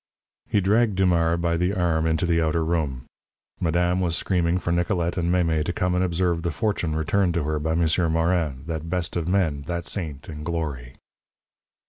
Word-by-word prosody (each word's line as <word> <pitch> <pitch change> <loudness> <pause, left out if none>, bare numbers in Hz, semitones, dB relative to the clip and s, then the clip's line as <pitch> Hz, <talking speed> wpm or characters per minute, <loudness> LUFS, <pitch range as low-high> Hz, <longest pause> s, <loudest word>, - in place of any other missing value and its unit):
He 105 - +2
dragged 105 +2 +2
Dumars 85 -3 +2
by 85 0 0
the 90 +4 0
arm 80 -3 +1
into 80 +1 +1
the 85 -1 +2
outer 80 0 +1
room. 75 -7 -1 0.5
Madame 90 +2 +1
was 85 -2 0
screaming 90 -2 +1
for 85 - -2
Nicolette 85 0 0
and 85 -2 0
Mémé 85 -4 +2
to 90 - -2
come 90 0 0
and 90 +1 +2
observe 85 -1 0
the 85 - -1
fortune 85 -1 -1
returned 90 +3 +1
to 85 - +1
her 75 0 -1
by 80 +2 -1
M'sieur 85 0 +2
Morin, 80 -5 0
that 80 0 -4
best 90 -1 -2
of 85 -2 -1
men, 85 -7 +1
that 85 -1 -3
saint 75 -8 -4
in 75 -1 -7
glory. 75 -7 -4
85 Hz, 185 wpm, -24 LUFS, 80-90 Hz, 0.5 s, He